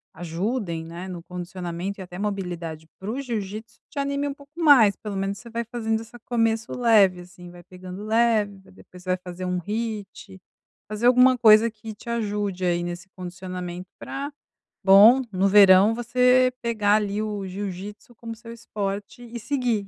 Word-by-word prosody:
ajudem, 170 Hz, +1 st, -3 dB
né, 170 Hz, +3 st, -8 dB
no 175 Hz, -2 st, -7 dB
condicionamento 180 Hz, +2 st, -6 dB
e -, -, -5 dB
até 180 Hz, 0 st, -10 dB
mobilidade 175 Hz, -6 st, -4 dB
para 195 Hz, +3 st, -6 dB
o 265 Hz, -, -4 dB
jiu-jítsu, 220 Hz, -3 st, -5 dB
te 300 Hz, -, -15 dB
anime 280 Hz, +1 st, -1 dB
um 280 Hz, -, -3 dB
pouco 280 Hz, 0 st, -18 dB
mais. 245 Hz, -, +6 dB
Pelo 210 Hz, -2 st, -7 dB
menos 195 Hz, +1 st, -2 dB
você 235 Hz, -, -12 dB
vai 235 Hz, +1 st, -3 dB
fazendo 225 Hz, -1 st, -2 dB
essa 230 Hz, +2 st, -13 dB
começo 225 Hz, -1 st, -1 dB
leve 205 Hz, -7 st, +4 dB
assim, 180 Hz, 0 st, -13 dB
vai 175 Hz, 0 st, -14 dB
pegando 185 Hz, +2 st, -10 dB
leve, 215 Hz, -3 st, +2 dB
vai 190 Hz, -, -20 dB
depois 180 Hz, -1 st, -16 dB
vai 185 Hz, 0 st, 0 dB
fazer 180 Hz, 0 st, -7 dB
um 180 Hz, 0 st, -1 dB
HIIT, 210 Hz, -3 st, -5 dB, 0.5 s
fazer 215 Hz, +3 st, 0 dB
alguma 255 Hz, +1 st, +6 dB
coisa 225 Hz, 0 st, +6 dB
que 220 Hz, 0 st, -9 dB
te 235 Hz, -, -11 dB
ajude 205 Hz, -4 st, -2 dB
aí 175 Hz, -1 st, +1 dB
nesse 175 Hz, +1 st, -6 dB
condicionamento 180 Hz, 0 st, -7 dB
pra 280 Hz, +2 st, -6 dB, 0.5 s
bom, 215 Hz, +7 st, +8 dB
no 190 Hz, +1 st, +2 dB
verão 200 Hz, +2 st, +7 dB
você 250 Hz, +1 st, +3 dB
pegar 215 Hz, -3 st, +2 dB
ali 205 Hz, -1 st, -1 dB
o 205 Hz, -3 st, -4 dB
jiu-jítsu 200 Hz, +4 st, -7 dB
como 230 Hz, 0 st, -8 dB
o -, -, -11 dB
seu 230 Hz, +1 st, -11 dB
esporte 205 Hz, 0 st, -5 dB
e 235 Hz, 0 st, -8 dB
seguir. 235 Hz, -4 st, -1 dB
205 Hz, 170 wpm, -24 LUFS, 185-230 Hz, 0.5 s, bom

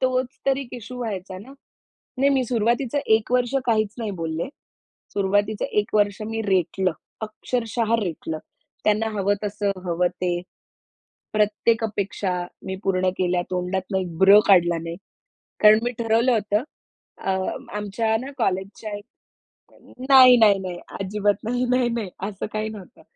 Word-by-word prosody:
तोच 255 Hz, 0 st, 0 dB
तर 270 Hz, -1 st, +3 dB
1 275 Hz, -3 st, -6 dB
इश्यू 245 Hz, +1 st, -8 dB
व्हायचा 190 Hz, -5 st, -5 dB
ना. 250 Hz, +8 st, -12 dB, 0.7 s
नाही 275 Hz, +2 st, +4 dB
मी 265 Hz, -1 st, +2 dB
सुरुवातीचं 240 Hz, +4 st, 0 dB, 0.2 s
एक 220 Hz, +2 st, -3 dB
वर्ष 250 Hz, +1 st, +1 dB
काहीच 215 Hz, -3 st, +1 dB
नाही 225 Hz, -3 st, -3 dB
बोलले. 160 Hz, 0 st, -2 dB, 0.7 s
सुरुवातीचं 205 Hz, +1 st, +1 dB, 0.2 s
1 210 Hz, -, -6 dB
वर्ष 205 Hz, 0 st, +2 dB
मी 225 Hz, 0 st, -2 dB
रेटलं, 190 Hz, -2 st, +1 dB, 0.3 s
अक्षरशः 230 Hz, +1 st, -1 dB
रेटलं. 160 Hz, -4 st, -4 dB, 0.4 s
त्यांना 215 Hz, +1 st, +2 dB
हवं 200 Hz, +1 st, +2 dB
तसं, 205 Hz, 0 st, -1 dB
हवं 175 Hz, +1 st, +1 dB
ते. 180 Hz, -1 st, +1 dB, 1.0 s
प्रत्येक 215 Hz, +2 st, +2 dB
अपेक्षा 200 Hz, -2 st, -2 dB, 0.3 s
मी 190 Hz, 0 st, -3 dB
पूर्ण 185 Hz, -1 st, +2 dB
केल्या. 180 Hz, -1 st, +1 dB
तोंडातून 185 Hz, +1 st, -1 dB
एक 175 Hz, -3 st, -6 dB
ब्र 195 Hz, +3 st, +8 dB
काढला 175 Hz, -3 st, +5 dB
नाही. 165 Hz, 0 st, -5 dB, 0.6 s
कारण 215 Hz, 0 st, +7 dB
मी 245 Hz, -, 0 dB
ठरवलं 230 Hz, +2 st, +2 dB
होतं 210 Hz, +1 st, +1 dB, 0.6 s
अ, -, -, -3 dB, 0.4 s
आमच्या 210 Hz, +2 st, -1 dB
ना 270 Hz, +2 st, -7 dB
कॉलेजच्या 200 Hz, -1 st, -2 dB
एक 205 Hz, -, -13 dB, 1.0 s
नाही, 255 Hz, -2 st, +9 dB
नाही, 210 Hz, -4 st, +5 dB
नाही 185 Hz, -2 st, -5 dB, 0.2 s
अजिबात 205 Hz, +1 st, +1 dB
नाही, 245 Hz, +3 st, 0 dB
नाही, 250 Hz, -1 st, +2 dB
नाही 230 Hz, -4 st, -3 dB, 0.2 s
असं 195 Hz, -2 st, -5 dB
काही 215 Hz, 0 st, -2 dB
नव्हतं. 205 Hz, -4 st, -11 dB
210 Hz, 145 wpm, -23 LUFS, 190-230 Hz, 1.0 s, नाही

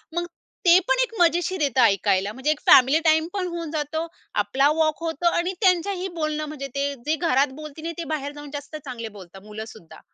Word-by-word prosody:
मग 345 Hz, -, 0 dB, 0.4 s
ते 345 Hz, +1 st, +8 dB
पण -, -, +2 dB
एक 475 Hz, -, -5 dB
मजेशीर 350 Hz, +1 st, +2 dB
येत 275 Hz, -4 st, 0 dB
ऐकायला, 200 Hz, -2 st, +3 dB
म्हणजे 265 Hz, +5 st, 0 dB
एक 310 Hz, -, -2 dB
फॅमिली 270 Hz, +4 st, +7 dB
टाईमपण 330 Hz, +4 st, +2 dB
होऊन 335 Hz, -3 st, -5 dB
जातो 315 Hz, +1 st, -2 dB, 0.4 s
आपला 270 Hz, +7 st, +2 dB
वॉक 315 Hz, +1 st, +1 dB
होतो 330 Hz, +1 st, -1 dB
आणि 355 Hz, +2 st, 0 dB
त्यांच्याही 370 Hz, 0 st, +2 dB
बोलणं 305 Hz, 0 st, -1 dB
म्हणजे 290 Hz, -2 st, -6 dB
ते 280 Hz, 0 st, -1 dB
जे 310 Hz, +2 st, +1 dB
घरात 280 Hz, -4 st, +1 dB
बोलतील 305 Hz, +1 st, -9 dB
नाही 335 Hz, +1 st, -3 dB
ते 340 Hz, -, -3 dB
बाहेर 285 Hz, -1 st, -3 dB
जाऊन 290 Hz, 0 st, -9 dB
जास्त 290 Hz, +2 st, -7 dB
चांगले 235 Hz, -4 st, -6 dB
बोलतात 190 Hz, -2 st, -13 dB
मुलं 215 Hz, +1 st, -7 dB
सुद्धा. 175 Hz, -7 st, -14 dB
305 Hz, 195 wpm, -24 LUFS, 265-335 Hz, 0.4 s, ते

